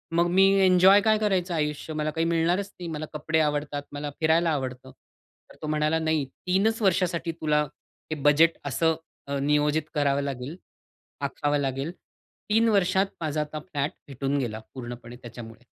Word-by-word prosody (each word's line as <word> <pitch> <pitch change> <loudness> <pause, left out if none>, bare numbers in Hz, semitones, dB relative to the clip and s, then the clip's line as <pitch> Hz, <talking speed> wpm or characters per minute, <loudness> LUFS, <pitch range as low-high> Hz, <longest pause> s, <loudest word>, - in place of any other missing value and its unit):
मग 170 +1 +4
मी 190 +1 +5 0.2
एन्जॉय 185 +2 +7
काय 215 0 +3
करायचं 190 -4 0
आयुष्य? 150 0 -2
मला 155 0 -1
काही 165 +1 -1
मिळणारच 170 +4 +1
नाही. 175 - -5
मला 155 0 -4
कपडे 155 +1 0
आवडतात, 145 -1 -1
मला 145 0 -4
फिरायला 165 +1 +3
आवडतं." 130 -2 -4
तर - - -25
तो 155 - -4
म्हणाला 155 +1 +1
नाही 160 -3 0
3च 195 - 0
वर्षासाठी 180 -4 +1
तुला 150 -2 +1 0.5
हे - - 0
बजेट 155 +3 +5
असं 160 +4 +1 0.3
अ, 140 0 -2
नियोजित 150 +2 +2
करावं 140 -2 +1
लागेल, 140 +2 -4 0.7
आखावं 145 +1 0
लागेल, 135 +3 -2 0.6
3 225 +2 +4
वर्षात 190 -2 +3 0.2
माझा 155 -1 -1
आता 150 0 -5
फ्लॅट 145 -2 -3 0.2
भेटून 140 +1 -2
गेला 110 -4 -3
पूर्णपणे 120 -1 -8
त्याच्यामुळे. 115 -1 -10
155 Hz, 155 wpm, -26 LUFS, 140-170 Hz, 0.7 s, एन्जॉय